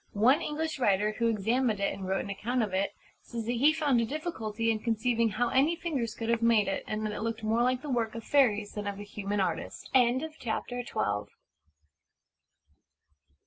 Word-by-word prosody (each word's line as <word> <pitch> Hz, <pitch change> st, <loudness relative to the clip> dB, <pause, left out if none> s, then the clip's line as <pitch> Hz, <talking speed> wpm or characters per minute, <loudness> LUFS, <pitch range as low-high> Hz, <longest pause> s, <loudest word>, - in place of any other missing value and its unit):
One 250 Hz, +8 st, +5 dB
English 315 Hz, 0 st, -3 dB
writer, 210 Hz, -3 st, +2 dB
who 230 Hz, -, +3 dB
examined 225 Hz, +1 st, +1 dB
it 200 Hz, -, 0 dB
and 190 Hz, -1 st, -6 dB
wrote 190 Hz, 0 st, 0 dB
an 200 Hz, -, -5 dB
account 240 Hz, +5 st, -1 dB
of 205 Hz, -3 st, -3 dB
it, 195 Hz, +1 st, 0 dB, 0.3 s
says 230 Hz, -2 st, -6 dB
that 235 Hz, -, -1 dB
he 260 Hz, +6 st, +4 dB
found 295 Hz, -6 st, +2 dB
a -, -, +1 dB
difficulty 230 Hz, -7 st, -2 dB
in 220 Hz, -, -1 dB
conceiving 230 Hz, +1 st, +1 dB
how 235 Hz, +4 st, 0 dB
any 290 Hz, +6 st, +3 dB
fingers 280 Hz, -10 st, -3 dB
could 225 Hz, -, -4 dB
have 235 Hz, 0 st, +2 dB
made 230 Hz, -3 st, +4 dB
it, 195 Hz, -, -2 dB
and 215 Hz, 0 st, -2 dB
that 210 Hz, -, -2 dB
it -, -, -5 dB
looked 225 Hz, 0 st, -3 dB
more 220 Hz, +2 st, +2 dB
like 255 Hz, +2 st, +1 dB
the -, -, -6 dB
work 230 Hz, -2 st, 0 dB
of 230 Hz, -, -6 dB
fairies 215 Hz, -8 st, +3 dB
than 210 Hz, -1 st, -5 dB
of 200 Hz, -1 st, -3 dB
a -, -, -5 dB
human 205 Hz, 0 st, -3 dB
artist. 175 Hz, -4 st, -3 dB, 0.5 s
CHAPTER 245 Hz, +1 st, -3 dB
XIII. 105 Hz, -, -2 dB
230 Hz, 195 wpm, -29 LUFS, 210-250 Hz, 0.5 s, One